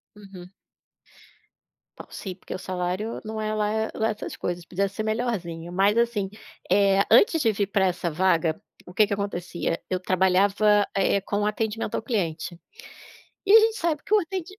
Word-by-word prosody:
Uhum. 195 -3 -13 1.5
Bom, - - -9
sim, 190 - -6
porque 185 - -8
o - - -4
salário 185 +4 -3
não 220 0 -5
é 215 0 -2
lá 210 -1 0
eh, 220 0 -1
lá 220 0 0
essas 215 -1 -5
coisas, 175 -1 -4
podia 195 +3 -1
ser 210 +2 -5
melhorzinho. 200 -7 -3
Mas, 195 +3 +3
assim, 230 -4 +1 0.4
eh, 195 -1 +4
antes 330 -5 +6
de 230 -7 +3
vir 200 -1 -1
pra 195 -1 +1
essa 180 -1 -1
vaga, 165 -1 +1 0.3
o 180 - -11
que 215 +3 +5
que 205 - -3
acontecia? 180 -4 -3
Eu 185 - -1
trabalhava, 195 +3 +3
eh, 200 0 +2
com 205 +2 -2
atendimento 215 +1 -2
ao - - -1
cliente. 170 -7 -3 0.9
E 395 - +4
a 445 - +10
gente 445 0 +2
sabe 325 -6 -1
que - - -9
o 425 - +6
atendi 375 +2 -6
200 Hz, 175 wpm, -25 LUFS, 180-220 Hz, 1.5 s, a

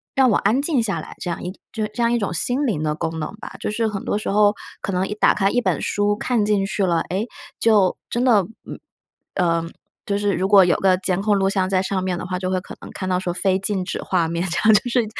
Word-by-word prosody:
让 265 -2 +5
我 - - +3
安 230 +7 +2
静 285 -5 +1
下 195 -8 -1
来， - - -11
这 175 - -4
样 170 - -4
一 180 - -4 0.2
就 220 -2 -1
这 235 +3 -6
样 235 +1 +2
一 - - +3
种 200 -5 -2
心 250 - +1
灵 185 - -1
的 150 -1 -1
功 160 0 -3
能 175 - -5
吧， - - -8
就 - - -3
是 220 +1 0
很 195 -2 -5
多 - - 0
时 210 - -4
候 205 +1 +4 0.2
可 195 - -4
能 185 +1 +1
一 210 - -4
打 - - +4
开 195 -1 +1
一 245 - +1
本 - - 0
书 205 0 +1
看 225 -1 0
进 205 -2 +1
去 195 -1 -1
了， 170 -2 +1
诶， 200 +6 -2 0.3
就 210 -5 +3
真 240 +1 -1
的， 220 -7 +4 0.2
嗯， - - -7 0.6
呃， 170 -2 +1 0.4
就 200 0 0
是 205 -1 0
如 190 - 0
果 200 -2 +7
有 175 - +3
个 185 -1 +3
监 185 0 -1
控 205 -1 +2
录 195 0 +2
像 190 -1 0
在 185 -1 +2
上 190 -1 -2
面 180 -2 -1
的 - - -5
话， 180 0 -3
就 185 0 -2
会 185 - +1
可 - - -10
能 - - -9
看 185 - -5
到 180 0 +1
说 175 -2 -3
非 190 +1 +1
静 195 -1 -1
止 - - -4
画 175 -3 0
面， 170 +2 -2
这 165 - -2
样， - - +8
就 215 +4 +3
是 235 -2 +2
195 Hz, 295 characters per minute, -21 LUFS, 185-215 Hz, 0.6 s, 样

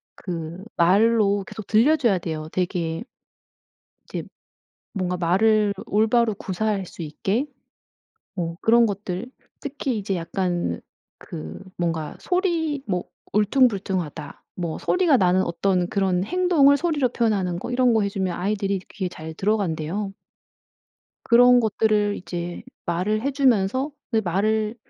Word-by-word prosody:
그 170 0 -6
말로 205 +3 +4
계속 215 - -8
들려줘야 230 - +3
돼요. 155 -2 -5
되게 175 -1 -2 1.1
이제 - - -4 0.7
뭔가 180 -2 -2
말을 205 +4 +3
올바로 220 +2 +2
구사할 195 +1 -2
수 175 - -10
있게. 195 - -1 0.9
어 165 -1 -2
그런 235 +1 +5
것들 200 +2 -4 0.3
특히 275 -3 -3
이제 195 -1 -2
약간 175 - -2 0.4
그 80 0 -8 0.2
뭔가 165 -3 -2
소리 335 -6 0
뭐 180 -3 -1 0.3
울퉁불퉁하다 195 - 0
뭐 170 -3 -3
소리가 355 -7 +3
나는 185 -2 +3
어떤 180 +1 0
그런 190 -2 +1
행동을 320 - +4
소리로 295 -5 +1
표현하는 200 -7 0
거 220 - -6
이런 245 -1 +3
거 220 - +3
해주면 195 -3 -2
아이들이 200 0 -1
귀에 190 -3 -3
잘 160 -2 -8
들어간대요. 195 -1 -1 1.1
그런 245 +1 +6
것들을 215 -2 +1
이제 175 -1 -5 0.2
말을 185 +6 0
해주면서 260 -2 +2 0.2
그 225 - +2
말을 215 +5 0
200 Hz, 255 characters per minute, -23 LUFS, 180-230 Hz, 1.1 s, 그런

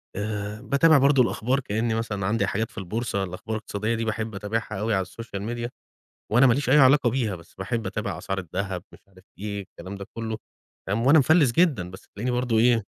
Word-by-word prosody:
آآ 105 +1 -4
باتابع 145 +4 +5
برضه 140 0 +5
الأخبار 125 +3 0
كإنّي 115 -2 -1
مثلًا 105 -4 -2
عندي 105 0 +1
حاجات 110 +3 -1
في - - -21
البورصة، 100 +1 -2
الأخبار 95 +4 -5
الاقتصادية 110 +1 -2
دي 115 0 -2
باحب 110 -1 -3
أتابعها 105 +1 -3
أوي 110 +2 0
على 95 -2 +1
الSocial 100 +2 -7 0.2
Media 120 0 -3 0.6
وأنا 125 +5 +6
ماليش 125 +2 +2
أي 140 - +6
علاقة 135 -1 +6
بيها، 115 -5 -1
بس 85 -1 -15
باحب 110 +3 -2
أتابع 100 -2 -3
أسعار 95 +2 -3
الدهب 95 +1 -4
مش - - -15
عارف 95 -1 -20 0.2
إيه، 100 0 -4
الكلام 95 0 -9
ده 100 - -7
كُلّه 110 -1 -3 0.5
فاهم، 105 +5 0
وأنا 155 +3 +8
مفلِّس 150 -2 +5
جدًا، 120 - +2
بس 95 - -12
تلاقيني 120 +5 -3
برضه 125 -2 +1
إيه، 115 -1 +4
110 Hz, 200 wpm, -25 LUFS, 100-120 Hz, 0.6 s, وأنا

